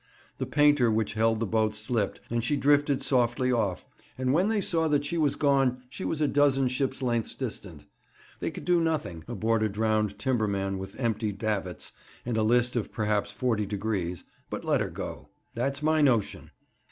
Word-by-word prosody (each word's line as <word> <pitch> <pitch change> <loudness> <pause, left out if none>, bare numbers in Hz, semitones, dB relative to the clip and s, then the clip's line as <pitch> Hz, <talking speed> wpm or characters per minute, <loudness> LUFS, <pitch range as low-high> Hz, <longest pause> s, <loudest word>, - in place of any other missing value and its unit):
The - - -2
painter 145 -4 +4
which 110 -1 0
held 110 0 +2
the 115 - 0
boat 110 0 +1
slipped, 110 -1 -1
and 120 -1 0
she 145 +5 +1
drifted 145 0 +3
softly 125 0 +2
off, 105 -7 0 0.3
and 130 0 +1
when 180 +6 +3
they 220 -1 +1
saw 165 -4 +1
that 145 -1 +1
she 145 - -3
was 155 -4 +2
gone 135 -3 +2
she 190 - -7
was 160 - -2
a 150 - +3
dozen 140 -2 +3
ships' 135 +1 -2
lengths 120 -3 -1
distant. - - -6 0.5
They - - -2
could - - -8
do 175 -1 +3
nothing, 155 - -2
aboard 115 -1 0
a 110 - +2
drowned 105 0 0
timberman 100 -5 -1
with 95 +5 -8
empty 110 -3 0
davits, 100 -3 -3 0.3
and 120 -1 -2
a 110 - +2
list 120 +3 +2
of 120 - -2
perhaps 105 -1 0
forty 105 -1 -1
degrees, 100 -4 -3 0.3
but - - -5
let - - +2
her - - -1
go. - - -7 0.2
That's 135 +5 -2
my 155 0 +3
notion. 120 -8 +1
120 Hz, 185 wpm, -28 LUFS, 110-140 Hz, 0.5 s, painter